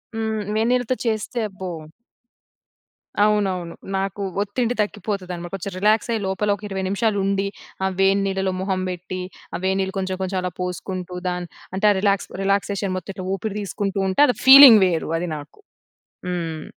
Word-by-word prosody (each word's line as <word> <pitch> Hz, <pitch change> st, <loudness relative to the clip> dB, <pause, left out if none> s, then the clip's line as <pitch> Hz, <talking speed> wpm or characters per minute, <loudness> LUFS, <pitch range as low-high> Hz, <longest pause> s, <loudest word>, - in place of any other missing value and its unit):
హ్మ్. 220 Hz, -1 st, -2 dB
వేడినీళ్ళతో 245 Hz, +3 st, +1 dB
చేస్తే 225 Hz, +1 st, -1 dB
అబ్బో! 190 Hz, -1 st, -8 dB, 1.6 s
అవునవును. 190 Hz, -5 st, 0 dB, 0.2 s
నాకు 195 Hz, +1 st, -3 dB, 0.2 s
ఒత్తిడి 235 Hz, +4 st, -1 dB
తగ్గిపోతది 200 Hz, -2 st, -3 dB
అన్నమాట. 175 Hz, 0 st, -8 dB
కొంచెం 195 Hz, 0 st, -6 dB
రిలాక్సై 215 Hz, +3 st, +2 dB
లోపల 190 Hz, +2 st, -1 dB
ఒక 205 Hz, -, -17 dB
20 190 Hz, -1 st, -3 dB
నిమిషాలు 210 Hz, +1 st, 0 dB
ఉండి. 195 Hz, 0 st, 0 dB, 0.4 s
ఆ -, -, +3 dB
వేడి 195 Hz, +1 st, +4 dB
నీళ్ళలో 190 Hz, -1 st, -1 dB
మొహం 190 Hz, -1 st, -1 dB
బెట్టి. 180 Hz, +1 st, -5 dB, 0.3 s
ఆ -, -, -1 dB
వేడి 190 Hz, 0 st, +1 dB
నీళ్ళు 190 Hz, 0 st, -2 dB
కొంచెం, 190 Hz, 0 st, -2 dB
కొంచెం 190 Hz, 0 st, -2 dB
అలా 180 Hz, 0 st, -3 dB
పోసుకుంటూ, 180 Hz, 0 st, -4 dB
దాన్ 180 Hz, -1 st, -3 dB, 0.3 s
అంటే 210 Hz, +2 st, +4 dB
రిలాక్స్ 200 Hz, -1 st, +1 dB
రిలాక్సేషన్ 200 Hz, 0 st, 0 dB
మొత్తం 185 Hz, -, -6 dB
ఇట్ల 185 Hz, -, -6 dB
ఊపిరి 205 Hz, +1 st, -5 dB
తీసుకుంటూ 200 Hz, 0 st, -3 dB
ఉంటే, 190 Hz, +7 st, +2 dB
అది 250 Hz, -, +1 dB
ఫీలింగ్ 265 Hz, -5 st, +11 dB
వేరు 165 Hz, -3 st, -1 dB
అది 175 Hz, 0 st, -3 dB
నాకు. 145 Hz, -, -12 dB, 0.7 s
హ్మ్. 165 Hz, -3 st, -3 dB
195 Hz, 155 wpm, -22 LUFS, 185-210 Hz, 1.6 s, ఫీలింగ్